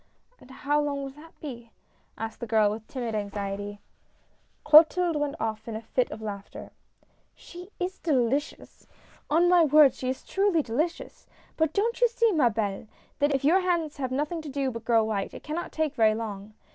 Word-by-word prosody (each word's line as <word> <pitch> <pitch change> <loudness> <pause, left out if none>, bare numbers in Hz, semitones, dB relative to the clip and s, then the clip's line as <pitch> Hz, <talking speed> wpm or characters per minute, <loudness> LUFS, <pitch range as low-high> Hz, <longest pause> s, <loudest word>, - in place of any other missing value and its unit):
" - - -39
And 255 - -17
how 290 +3 0
long 285 -1 -2
will 270 - -6
that 305 +4 -16
be? 240 -6 -8 0.2
" - - -40
asked 225 0 -6
the 235 - -5
girl, 215 -2 +3
with 220 +1 -7
timid 240 -4 -4
anxiety. 205 0 -4 0.8
Clotilde 320 +3 +6
went 295 -1 -1
off 220 0 -3
in 225 - -5
a 220 - -5
fit 250 +2 0
of 220 +1 -8
laughter. 200 -2 -7 0.3
" - - -43 0.3
She 360 +1 -12
is 365 +1 -3
delicious! 280 -3 -1 0.4
on 335 +4 +4
my 350 -1 +6
word 300 -3 +6
she 255 - -4
is 260 - -4
truly 385 -5 +1
delicious 305 +9 -3
I - - -32 0.2
But 320 -1 0
don't 465 +4 0
you 485 - +7
see, 465 -1 +2
ma 295 -10 +3
helle, 210 -1 -3 0.3
that 290 -1 +2
if 270 - -2
your 345 +6 +5
hands 345 -5 -1
have 260 -2 -2
nothing 300 +5 -2
to 310 - -8
do 270 -1 -1
but 230 -1 -8
grow 230 -1 +4
white, 210 -3 -2
that - - -7
it - - -15
cannot 315 +3 -4
take 315 -3 -1
very 220 -1 +3
long. 210 -2 -6
275 Hz, 205 wpm, -27 LUFS, 220-320 Hz, 0.8 s, you